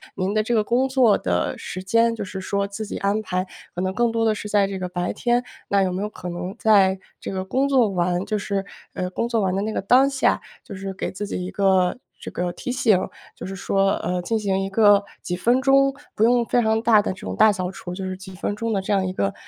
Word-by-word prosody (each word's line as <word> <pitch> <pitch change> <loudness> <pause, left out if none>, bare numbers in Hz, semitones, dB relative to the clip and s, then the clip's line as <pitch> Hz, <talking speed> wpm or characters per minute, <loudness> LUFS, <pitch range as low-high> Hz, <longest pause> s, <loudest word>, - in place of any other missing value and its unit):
您 190 +1 -1
的 215 - +2
这 235 +2 -1
个 215 - +3
工 250 +5 +1
作 255 -6 +4
的 90 -1 -1
时 185 - -6
间 230 +4 +2
就 215 - -5
是 190 0 -6
说 200 +1 -1
自 200 +2 -6
己 - - -5
安 200 +2 0
排， 185 -3 -2 0.3
可 180 - -2
能 185 0 -1
更 235 +2 +1
多 225 0 0
的 220 - +3
是 210 0 -6
在 205 -1 +3
这 195 -1 -4
个 180 - -4
白 180 0 -2
天， 240 0 +1 0.2
那 200 -1 +3
有 185 - 0
没 185 - -3
有 210 - -2
可 180 - -9
能 180 +4 -5
在 195 -4 +4 0.2
这 - - -6
个 190 -1 -3
工 265 +8 0
作 255 -6 +4
完 180 0 0
就 215 - -1
是， 200 -1 -2 0.3
呃， 180 0 -3
工 235 +5 -2
作 230 -2 +1
完 190 -1 0
的 195 - 0
那 215 - -2
个 - - -2
当 255 +7 +4
下， 270 -1 +1 0.2
就 210 - -9
是 195 0 -5
给 - - -1
自 205 +2 -5
己 180 - -4
一 185 - -6
个 190 0 +2 0.2
这 - - -7
个 180 0 -2
提 250 - -5
醒？ 230 -6 +3 0.4
就 - - -8
是 195 +1 -6
说， 195 +1 +1
呃， 180 +1 -2
进 225 +5 -1
行 195 -2 0
一 195 - -2
个 205 0 +5 0.2
几 180 - -3
分 245 +6 +2
钟， 275 0 +4 0.2
不 215 - +1
用 240 0 +4
非 245 +1 +2
常 220 0 +1
大 225 -2 +5
的 200 - -2
这 185 - -14
种 - - -5
大 220 0 +6
扫 185 -1 -3
除， 180 -2 -8
就 190 - -5
是 185 - -3
几 190 0 -11
分 205 +2 -3
钟 230 +1 -2
的 195 - 0
这 195 - -4
样 190 -1 +2
一 185 - -2
个， 100 - -1
200 Hz, 285 characters per minute, -23 LUFS, 185-225 Hz, 0.4 s, 大